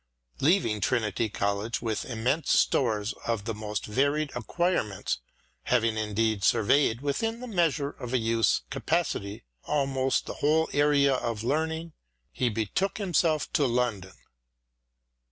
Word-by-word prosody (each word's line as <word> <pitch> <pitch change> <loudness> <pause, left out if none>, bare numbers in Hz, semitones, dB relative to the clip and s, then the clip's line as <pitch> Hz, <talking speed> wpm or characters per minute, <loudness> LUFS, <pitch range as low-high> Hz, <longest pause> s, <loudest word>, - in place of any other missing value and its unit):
Leaving 135 - +2
Trinity 110 -1 0
College 100 +5 -1
with 110 -4 -2
immense 125 +6 -1
stores 110 -2 +2
of 115 -3 -1
the 115 - -2
most 105 -1 -4
varied 140 +6 0
acquirements, 120 - -1 0.5
having 115 -3 +2
indeed 110 -1 0
surveyed, 120 +3 +3
within 225 +12 -1
the 250 - -6
measure 165 - 0
of 125 -4 -8
a 130 - +2
youth's 115 -1 +1
capacity, 135 -8 -2 0.2
almost 135 -2 0
the - - -5
whole 155 +2 +3
area 145 -1 +4
of 115 -4 -2
learning, 160 +5 -1 0.4
he 125 - 0
betook 115 - -1
himself 165 -6 +1
to 145 -4 +3
London. 115 -6 -1
125 Hz, 125 wpm, -27 LUFS, 110-150 Hz, 0.5 s, area